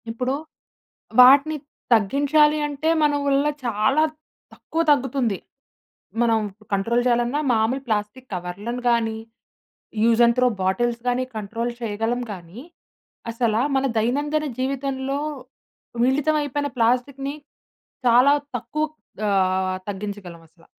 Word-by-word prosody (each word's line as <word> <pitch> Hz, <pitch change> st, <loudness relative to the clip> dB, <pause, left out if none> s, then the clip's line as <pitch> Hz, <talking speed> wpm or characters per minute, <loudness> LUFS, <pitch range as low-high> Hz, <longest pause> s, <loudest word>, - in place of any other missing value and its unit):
ఇప్పుడు 250 Hz, +4 st, -2 dB, 0.9 s
వాటిని 280 Hz, +5 st, +6 dB, 0.4 s
తగ్గించాలి 285 Hz, +7 st, +3 dB
అంటే 295 Hz, +2 st, -2 dB
మన 295 Hz, -1 st, +3 dB
వళ్ళ 280 Hz, 0 st, +2 dB, 0.2 s
చాలా 235 Hz, +6 st, +2 dB, 0.5 s
తక్కువ 325 Hz, -, -3 dB
తగ్గుతుంది. 260 Hz, -6 st, +1 dB, 0.8 s
మనం 230 Hz, -2 st, +3 dB, 0.3 s
కంట్రోల్ 230 Hz, +5 st, +1 dB
చేయాలన్నా 240 Hz, +3 st, +1 dB
మామూలు 225 Hz, +4 st, +1 dB
ప్లాస్టిక్కు 215 Hz, +4 st, -3 dB
కవర్లను 200 Hz, +8 st, -5 dB
గానీ, 225 Hz, -2 st, +1 dB, 0.9 s
యూజ్ 230 Hz, 0 st, +4 dB
అండ్ 235 Hz, 0 st, +3 dB
త్రో 250 Hz, -, +4 dB
బాటిల్స్ 235 Hz, +6 st, 0 dB
గానీ 245 Hz, +1 st, 0 dB
కంట్రోల్ 230 Hz, +3 st, -3 dB
చేయగలం 225 Hz, +2 st, -2 dB
కానీ, 180 Hz, +4 st, -11 dB, 0.7 s
అసల 230 Hz, -2 st, 0 dB, 0.2 s
మన 270 Hz, 0 st, +2 dB
దైనందిన 290 Hz, +7 st, 0 dB
జీవితంలో 270 Hz, +1 st, -2 dB, 0.9 s
మిళితం 290 Hz, +4 st, +2 dB
అయిపోయిన 290 Hz, 0 st, -2 dB
ప్లాస్టిక్కుని 255 Hz, +4 st, 0 dB, 0.7 s
చాలా 250 Hz, +4 st, +6 dB, 0.2 s
తక్కువ 290 Hz, +7 st, -2 dB, 0.4 s
ఆహ్, 185 Hz, -1 st, +1 dB
తగ్గించగలం 200 Hz, -4 st, -6 dB
అసల. 165 Hz, +1 st, -25 dB
240 Hz, 105 wpm, -23 LUFS, 215-275 Hz, 0.9 s, వాటిని